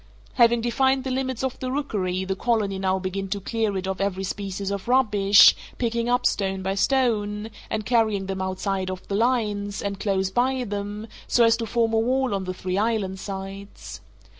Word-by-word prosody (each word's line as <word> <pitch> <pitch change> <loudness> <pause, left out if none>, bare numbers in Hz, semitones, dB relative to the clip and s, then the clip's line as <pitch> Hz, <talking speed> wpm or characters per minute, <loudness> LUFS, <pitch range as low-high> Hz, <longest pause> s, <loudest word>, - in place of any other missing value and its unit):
Having 235 -1 +4
defined 265 +3 +1
the 265 - -3
limits 260 -1 -2
of 265 -1 -2
the 255 -1 -3
rookery, 190 -10 -2
the 190 0 -2
colony 205 -3 0
now 190 0 +1
begin 190 +1 -3
to 200 +1 -3
clear 215 0 -1
it 190 - -3
of 190 0 -3
every 195 -1 -1
species 195 0 -4
of 200 +1 -4
rubbish, 210 -6 +6 0.2
picking 235 0 -1
up 245 0 +1
stone 195 -1 0
by 190 +1 -1
stone, 215 -2 0 0.2
and 215 -1 -2
carrying 220 -5 +2
them 190 0 -4
outside 190 0 -2
of 185 0 -7
the 200 - -1
lines, 210 -3 0
and 200 -1 -4
close 195 -2 0
by 255 +3 +1
them, 205 0 -5 0.2
so 240 - +4
as 230 0 +5
to 230 - -4
form 230 +1 +1
a 225 - +3
wall 255 +1 +1
on 195 -1 -2
the 185 - -3
three 185 +1 -2
inland 205 -4 -1
sides. 195 +1 -8
205 Hz, 190 wpm, -24 LUFS, 195-235 Hz, 0.2 s, rubbish